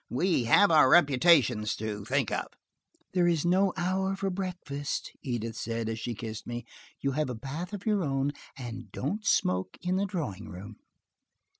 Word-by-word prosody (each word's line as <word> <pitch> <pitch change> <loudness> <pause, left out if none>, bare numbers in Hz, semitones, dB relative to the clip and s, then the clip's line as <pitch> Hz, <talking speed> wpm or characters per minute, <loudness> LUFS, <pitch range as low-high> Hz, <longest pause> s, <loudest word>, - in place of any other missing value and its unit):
We 150 -1 +1
have 200 - +6
our 150 -5 +7
reputations 135 -8 +5
to 105 -1 -4
think 135 -1 0
of." - - -1 0.7
"There 180 -2 +3
is 170 -2 +1
no 185 +2 +3
hour 190 +2 0
for 195 0 -2
breakfast," 180 -7 -4
Edith 115 -3 -3
said, 115 0 -3
as 110 0 -3
she 120 +1 -4
kissed 110 0 -6
me. 120 -1 -5 0.4
"You 140 - +1
have 150 0 -1
a 125 - -3
bath 140 +10 -6
of 205 -2 -7
your 210 -4 +2
own, 135 -1 0 0.3
and 120 -2 -7
don't 205 +11 -3
smoke 95 - +1
in 180 +1 0
the 200 +1 0
drawing 130 - -4
room." 100 +3 -9
140 Hz, 170 wpm, -29 LUFS, 115-180 Hz, 0.7 s, our